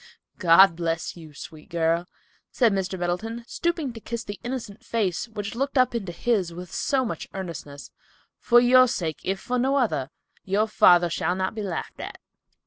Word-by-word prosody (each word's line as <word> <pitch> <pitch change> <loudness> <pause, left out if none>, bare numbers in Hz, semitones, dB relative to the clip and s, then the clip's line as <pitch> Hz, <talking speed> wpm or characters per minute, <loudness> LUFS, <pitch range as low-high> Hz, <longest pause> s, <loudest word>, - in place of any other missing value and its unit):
"God 180 +1 +7
bless 165 -1 -2
you, 160 -3 -12
sweet 155 +1 -11
girl," 170 +1 0 0.4
said 235 -5 +3
Mr. 190 -1 -2
Middleton, 215 +7 -3
stooping 325 -1 -2
to 225 - -9
kiss 235 +1 -5
the 205 -2 -7
innocent 240 -3 -5
face 220 -3 -1
which 210 -2 -5
looked 275 +4 -2
up 255 -1 +4
into 200 -7 -3
his 195 -1 0
with 175 0 -9
so 265 -2 +1
much - - -5
earnestness. 165 -6 -7 0.5
"For 240 0 +5
your 255 +1 +6
sake, 160 - -3
if 190 +1 -1
for 250 +4 -2
no 265 +3 +2
other, 210 - 0 0.3
your 205 +3 +1
father 175 -5 +5
shall 175 +1 0
not 190 0 -2
be 220 - -5
laughed 190 -5 -5
at." - - -7
195 Hz, 175 wpm, -25 LUFS, 175-240 Hz, 0.5 s, God